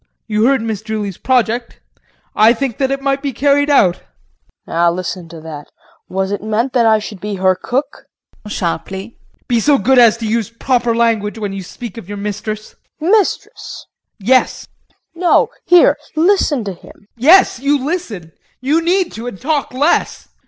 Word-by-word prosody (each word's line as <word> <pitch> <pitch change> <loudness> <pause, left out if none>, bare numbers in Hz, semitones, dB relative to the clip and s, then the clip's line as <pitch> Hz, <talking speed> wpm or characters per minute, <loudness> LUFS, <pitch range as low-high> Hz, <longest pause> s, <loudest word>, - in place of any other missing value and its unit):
You 215 0 +1
heard 270 -3 +2
Miss 220 -3 -3
Julie's 215 -4 -4
project, 240 -1 0 0.6
I 220 +2 +6
think 270 +1 -4
it 275 0 0
might 275 0 0
be 280 -1 -2
carried 285 +3 +2
out. 190 -11 +4
KRISTIN. - - -27 0.6
Now 170 +1 +2
listen 180 -1 -5
to 165 0 -10
that! 155 -2 -9 0.4
Was 190 +1 -2
it 205 - -3
meant 220 +5 -1
that 235 -3 +3
I 220 -1 +5
should 210 -2 -7
be 210 -1 -4
her 185 0 +3
cook 270 +9 -4 0.4
JEAN - - -8 0.3
[Sharply]. 195 +4 -9 0.3
Be 240 -2 +2
so 285 +5 +3
good 265 -1 +3
as 230 -2 +6
to 230 -1 -4
use 225 0 -1
proper 235 0 0
language 225 -2 0
when 205 -3 -4
you 195 - -5
speak 230 +4 -9
of 195 - -13
your 205 - -5
mistress. 210 +1 -5 0.2
KRISTIN. 325 +5 -1
Mistress? 425 -3 -1 0.3
JEAN. 200 - -12
Yes. 260 0 +2
KRISTIN. - - -42 0.2
No 345 +1 +2 0.2
hear! 350 0 +6 0.2
Listen 320 - +2
to 200 -2 -4
him! 175 - -16
JEAN. 200 - -26
Yes, 315 +3 +5
you 280 +3 +2
listen 235 - -4 0.3
you 290 +6 +1
need 355 +1 +1
to, 230 +2 -7
and 195 -6 -7
talk 290 +1 -1
less. 285 +6 0
230 Hz, 180 wpm, -16 LUFS, 205-275 Hz, 0.6 s, I